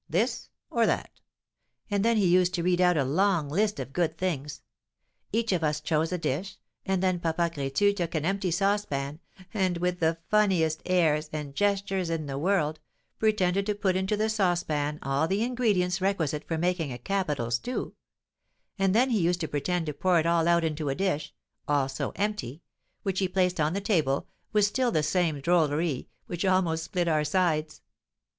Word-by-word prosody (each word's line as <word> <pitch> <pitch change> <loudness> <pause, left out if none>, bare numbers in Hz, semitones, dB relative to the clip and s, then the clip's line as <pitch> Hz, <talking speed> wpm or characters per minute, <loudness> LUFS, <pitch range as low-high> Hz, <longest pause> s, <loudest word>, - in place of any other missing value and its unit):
This, - - 0 0.2
or - - +3
that?' - - -2 0.7
And 200 -1 +1
then 230 0 +3
he 205 - +3
used 180 0 +3
to 170 - -2
read 180 0 +2
out 180 -2 +4
a 145 - +3
long 165 +2 +1
list 205 +7 0
of 135 - -6
good 165 -1 0
things. 150 -6 -3 0.7
Each 225 +1 0
of 175 -3 0
us 150 -1 +1
chose 155 +1 0
a 180 - 0
dish, 175 +5 -3 0.3
and 190 -1 +1
then 185 -2 +1
Papa 170 0 0
Crétu 145 +8 +1
took 175 -4 -3
an 155 -1 0
empty 195 +1 0
saucepan, 170 -6 -1 0.3
and, 185 -4 +1
with 180 +1 -1
the 160 0 +1
funniest 185 -7 +2
airs 160 -4 +2
and 150 -2 -5
gestures 195 -1 0
in 165 -2 -2
the 135 -1 -4
world, 160 -3 +1 0.4
pretended 200 -3 +1
to 210 - 0
put 195 -2 0
into 190 +3 0
the 215 +1 +1
saucepan 175 -8 0
all 135 +3 +1
the 195 +4 0
ingredients 205 -7 +1
requisite 160 -6 -1
for 165 - -1
making 175 -3 0
a 120 - -5
capital 150 -6 -2
stew; 185 - -2 0.9
and 195 0 +2
then 250 +3 +3
he 225 - +2
used 175 +1 +1
to 160 - -1
pretend 165 +4 -1
to 150 - -3
pour 175 +4 +2
it 160 - 0
all 170 -1 +2
out 170 -1 +4
into 155 -2 -2
a 135 - -1
dish 155 -5 -1 0.4
also 135 -2 0
empty 180 - -3 0.4
which 190 -2 -1
he 190 - +1
placed 180 -1 0
on 155 +1 +1
the 200 - -1
table, 160 -10 +1 0.2
with 210 -2 +4
still 250 +5 +1
the 155 -7 +1
same 160 -1 +1
drolleries, 155 -2 +1 0.2
which 175 +1 -4
almost 180 -4 +1
split 175 -2 -1
our 155 -2 +2
sides. 160 -3 0
175 Hz, 185 wpm, -27 LUFS, 155-195 Hz, 0.9 s, out